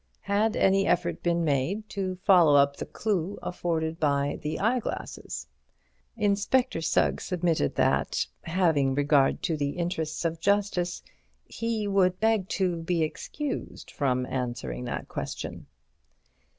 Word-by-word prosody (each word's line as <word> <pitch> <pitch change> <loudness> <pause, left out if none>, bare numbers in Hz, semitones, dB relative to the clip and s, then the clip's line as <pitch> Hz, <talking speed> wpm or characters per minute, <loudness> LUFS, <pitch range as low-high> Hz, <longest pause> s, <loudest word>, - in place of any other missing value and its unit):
Had 210 +2 +1
any 195 +1 +3
effort 170 -1 +1
been 170 -1 +1
made 160 +10 0
to 190 -2 -3
follow 175 -7 +6
up 140 0 +4
the - - -5
clue 200 -3 -2
afforded 165 -2 -2
by 145 -1 +1
the 155 +1 -3
eyeglasses? 230 +3 -2 0.7
Inspector 210 +1 +1
Sugg - - +1
submitted 170 - 0
that, - - +1 0.2
having 160 -6 +2
regard 145 -1 +3
to 165 - 0
the 145 +1 -2
interests 170 -2 -2
of 165 0 -1
justice, 195 -2 0 0.4
he 230 -2 -2
would 185 -2 +2
beg 220 -3 +2
to 185 -3 0
be 165 0 0
excused 280 - -5
from 130 -3 0
answering 125 -1 -4
that 120 - -4
question. - - -6
175 Hz, 125 wpm, -27 LUFS, 150-200 Hz, 0.7 s, follow